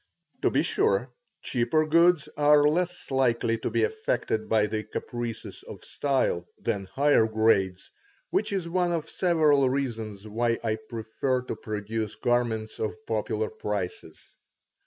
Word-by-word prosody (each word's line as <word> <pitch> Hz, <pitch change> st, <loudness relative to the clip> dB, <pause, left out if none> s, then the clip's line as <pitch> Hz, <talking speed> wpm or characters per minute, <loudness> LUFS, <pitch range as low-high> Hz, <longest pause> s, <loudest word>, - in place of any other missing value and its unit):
To -, -, +3 dB
be -, -, +2 dB
sure, 120 Hz, +6 st, +1 dB, 0.3 s
cheaper 125 Hz, +6 st, +1 dB
goods 170 Hz, 0 st, +4 dB
are 150 Hz, 0 st, +5 dB
less 180 Hz, +2 st, -1 dB
likely 120 Hz, -3 st, +2 dB
to -, -, -2 dB
be 115 Hz, 0 st, +1 dB
affected 120 Hz, -, -1 dB
by 110 Hz, -1 st, +4 dB
the 110 Hz, +1 st, -3 dB
caprices 120 Hz, -1 st, -5 dB
of -, -, -11 dB
style 130 Hz, -11 st, 0 dB
than 100 Hz, -4 st, -2 dB
higher 140 Hz, -2 st, +3 dB
grades, 110 Hz, -4 st, +1 dB, 0.4 s
which 380 Hz, -, 0 dB
is 190 Hz, -4 st, -2 dB
one 175 Hz, 0 st, +1 dB
of 160 Hz, -2 st, -2 dB
several 155 Hz, -7 st, +3 dB
reasons 110 Hz, -6 st, -3 dB
why 115 Hz, +2 st, 0 dB
I 110 Hz, -1 st, 0 dB
prefer 120 Hz, +3 st, -2 dB
to 125 Hz, -, -4 dB
produce 110 Hz, 0 st, -4 dB
garments 120 Hz, -3 st, -1 dB
of 110 Hz, 0 st, -2 dB
popular 110 Hz, 0 st, -1 dB
prices. 100 Hz, -4 st, -5 dB
120 Hz, 135 wpm, -27 LUFS, 110-145 Hz, 0.4 s, are